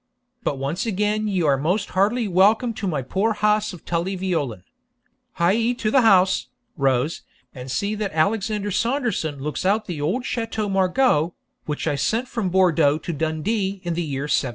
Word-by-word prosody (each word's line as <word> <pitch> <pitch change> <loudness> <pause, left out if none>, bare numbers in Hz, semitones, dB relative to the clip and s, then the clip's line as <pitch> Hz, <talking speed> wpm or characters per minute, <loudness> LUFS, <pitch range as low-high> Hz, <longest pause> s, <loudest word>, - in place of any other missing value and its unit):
But 145 - -2
once 150 - -2
again 210 +1 0
ye 190 -4 0
are 140 -3 +3
most 185 +8 0
heartily 215 +5 +1
welcome 210 +6 +3
to 210 -2 -4
my 150 -7 -1
poor 195 - 0
house 210 0 +1
of 180 - -12
Tully 175 +3 -1
Veolan! 150 - -2 0.7
Hie 220 +8 +2
to 220 -3 -2
the 265 - +5
house, 190 -4 +4 0.3
Rose, 135 +1 0 0.3
and 130 -1 -8
see 200 +10 -1
that 210 -2 -3
Alexander 205 +5 0
Saunderson 230 - -1
looks 145 +2 -4
out 205 +4 +1
the 165 -6 -5
old 195 - -1
Chateau 225 -3 -2
Margaux, 190 - +2 0.3
which 150 -1 -3
I 155 - +1
sent 225 - 0
from 230 -6 -2
Bourdeaux 165 -5 +3
to 165 +2 -5
Dundee 190 +6 -1
in 175 -1 -2
the 170 - -2
year 140 -4 -3
1713.' 145 -3 +1
190 Hz, 175 wpm, -23 LUFS, 155-215 Hz, 0.7 s, the